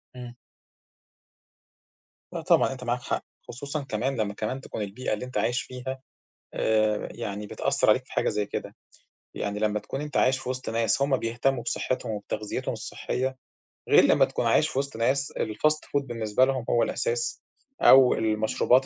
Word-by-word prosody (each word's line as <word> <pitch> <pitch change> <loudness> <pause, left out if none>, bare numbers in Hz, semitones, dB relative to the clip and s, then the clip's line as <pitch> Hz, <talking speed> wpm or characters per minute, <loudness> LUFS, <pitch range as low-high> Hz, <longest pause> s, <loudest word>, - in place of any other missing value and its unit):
إمم. 125 -1 -8 2.0
لا، - - -3
طبعًا - - +3
أنت 130 -1 -7
معاك 120 0 -1
حق، - - -3 0.2
خصوصًا 140 +4 -5
كمان 130 +2 -2
لمّا 105 -1 -2
كمان 110 +6 -3
تكون 110 - -6
البيئة 105 +4 -3
اللي 105 +4 -3
أنت 125 - -5
عايش 120 +1 +1
فيها 130 +1 -6 0.5
آآ 110 -1 +1
يعني 105 -3 -5
بتأثّر - - +1
عليك - - +4
في - - -19
حاجة - - +1
زي 105 0 -1
كده، - - -6 0.6
يعني 100 0 -3
لمّا 105 0 +1
تكون 135 +6 -5
أنت 150 0 -3
عايش 130 0 +4
في 130 - -6
وسط 130 0 -3
ناس 115 +1 +1
هُم 140 -1 +3
بيهتموا 120 +2 0
بصحتهم 120 0 -2
وبتغذيتهم 105 0 -3
الصحية 130 +1 -3 0.5
غير - - +7
لمّا - - +5
تكون - - -3
عايش - - +4
في 130 - -1
وسط 140 -4 -4
ناس 135 +5 +1
الfast 150 +9 +1
food 140 0 +1
بالنسبة 115 0 +1
لهم 130 -3 -1
هو 120 - +3
الأساس 475 -1 -1 0.4
أو 130 -1 +8
المشروبات 110 +4 +2
125 Hz, 165 wpm, -27 LUFS, 110-135 Hz, 2.0 s, أو